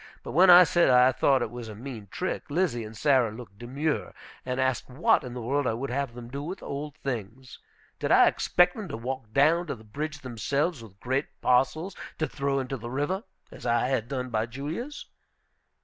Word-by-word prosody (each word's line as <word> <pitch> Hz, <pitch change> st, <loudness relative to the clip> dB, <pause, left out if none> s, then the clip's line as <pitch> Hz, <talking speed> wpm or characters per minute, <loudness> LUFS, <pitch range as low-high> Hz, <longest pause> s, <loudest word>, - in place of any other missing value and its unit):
But -, -, -6 dB
when 180 Hz, +5 st, +6 dB
I 180 Hz, 0 st, +11 dB
said 175 Hz, -1 st, +3 dB
I 125 Hz, 0 st, +6 dB
thought 130 Hz, 0 st, +2 dB
it 110 Hz, -, -4 dB
was 120 Hz, -2 st, -7 dB
a 105 Hz, -, -8 dB
mean 115 Hz, -2 st, -8 dB
trick, 185 Hz, -, -4 dB
Lizzie 145 Hz, -7 st, 0 dB
and 110 Hz, 0 st, -9 dB
Sarah 130 Hz, -2 st, +3 dB
looked 110 Hz, -3 st, -11 dB
demure, 140 Hz, +6 st, -2 dB, 0.3 s
and 125 Hz, 0 st, -3 dB
asked 130 Hz, -1 st, 0 dB
what 135 Hz, +6 st, +2 dB
in 125 Hz, -1 st, -7 dB
the 125 Hz, -, -5 dB
world 140 Hz, +3 st, 0 dB
I 110 Hz, -, 0 dB
would 130 Hz, +2 st, -4 dB
have 135 Hz, -2 st, -2 dB
them 120 Hz, -1 st, -8 dB
do 140 Hz, +3 st, -5 dB
with 175 Hz, +6 st, -5 dB
the -, -, -12 dB
old 145 Hz, +1 st, -5 dB
things. 125 Hz, 0 st, -6 dB, 0.4 s
Did -, -, -1 dB
I -, -, +7 dB
expect 180 Hz, 0 st, +3 dB
them 215 Hz, -3 st, -6 dB
to 135 Hz, -, -5 dB
walk 125 Hz, -1 st, -5 dB
down 155 Hz, +7 st, +3 dB
to -, -, -3 dB
the 110 Hz, -, -15 dB
bridge 145 Hz, +7 st, -5 dB
themselves 140 Hz, +5 st, -1 dB
with 100 Hz, -3 st, -14 dB
great 130 Hz, +3 st, -1 dB
parcels 155 Hz, +9 st, +1 dB, 0.2 s
to 155 Hz, -, 0 dB
throw 140 Hz, -1 st, -1 dB
into 135 Hz, 0 st, -3 dB
the 120 Hz, 0 st, -7 dB
river, 145 Hz, -, -2 dB, 0.3 s
as -, -, -12 dB
I 120 Hz, +1 st, +1 dB
had 120 Hz, -4 st, 0 dB
done 130 Hz, -1 st, -4 dB
by 110 Hz, 0 st, 0 dB
Julia's? 155 Hz, -, -6 dB
130 Hz, 210 wpm, -27 LUFS, 120-150 Hz, 0.4 s, I